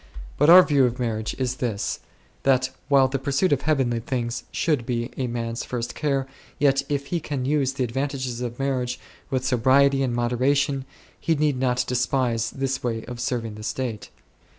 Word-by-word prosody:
But 150 - +3
our 180 +2 +10
view 140 -5 +3
of 125 0 -1
marriage 110 -3 -2
is 130 -1 -1
this; 115 -6 -2 0.4
that, 130 -1 +2 0.2
while 135 -2 +5
the 135 +1 -2
pursuit 140 +5 +1
of 140 - 0
heavenly 135 -6 +1
things 120 0 -3
should 150 -7 0
be 120 +1 -2
a 130 - -2
man's 115 0 -3
first 120 -2 -4
care, 140 -3 0 0.3
yet 135 -1 +3
if 140 -1 -1
he 170 - +2
can 140 -4 -3
use 140 -1 +1
the 130 -2 -1
advan 135 +4 -2
tages 130 -3 -4
of 120 -1 -4
marriage 130 -2 -1 0.3
with 130 -1 -1
sobriety 135 +2 +4
and 125 -3 0
moderation, 130 +3 +1 0.3
he 165 - +1
need 145 -3 +1
not 125 -1 +1
despise 125 -2 0
this 135 -1 -2
way 115 -2 -2
of 120 0 -7
serving 120 -3 -2
the 105 - -10
state. 120 -2 -4
130 Hz, 180 wpm, -24 LUFS, 120-140 Hz, 0.4 s, our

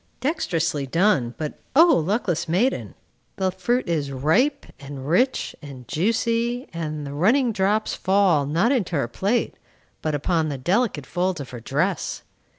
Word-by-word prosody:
Dexterously 165 - -1
done; 155 - +2
but 155 -2 -5 0.2
O 325 +4 +9
luckless 170 -1 0
maiden! 210 +11 0 0.4
the 190 -1 0
fruit 240 +7 -1
is 150 -5 -1
ripe, 200 - +1
and 140 -1 -8
rich, 250 - +1
and 135 -5 -10
juicy, 230 - 0
and 155 -3 -4
the 140 - -6
running 230 - +3
drops 210 +1 0
fall, 190 -7 +2
not 170 - +2
into 205 -11 0
her 140 -5 0
plate, 200 - -1 0.5
but 155 -1 -1
upon 160 +2 0
the 140 - -3
delicate 175 - 0
folds 180 0 -1
of 140 - -7
her 125 - -7
dress. 150 - -2
175 Hz, 150 wpm, -23 LUFS, 145-220 Hz, 0.5 s, O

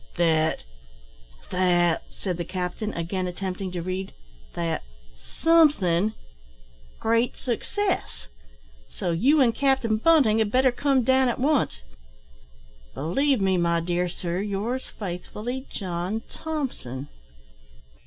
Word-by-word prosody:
"That 160 -2 +2 0.9
that 175 -2 +3
" - - -26
said 180 -4 -4
the 175 - -2
captain, 185 +4 -3
again 180 +2 -2
attempting 185 +1 -4
to 175 -2 -3
read, 185 +1 -4 0.4
"that 165 -1 -1 0.3
somethin' 215 - +3 0.8
great 230 +2 +1
success; 375 - -2 0.6
so - - -3
you 270 - +4
and 235 -3 +4
Captain 260 -4 +2
Bunting 250 -5 +4
had 220 -2 +2
better 255 +1 +4
come 270 0 +2
down 260 +2 +4
at 240 - -1
once. 260 - +1 1.1
"Believe 265 - +1
me, 190 -1 +2
my 170 -1 +2
dear 175 +1 -1
Sir, 175 +1 -3
Yours 210 +6 -2
faithfully, 215 +7 -6
John 185 +3 -3
Thomson." 255 - -4
195 Hz, 115 wpm, -25 LUFS, 175-255 Hz, 1.1 s, you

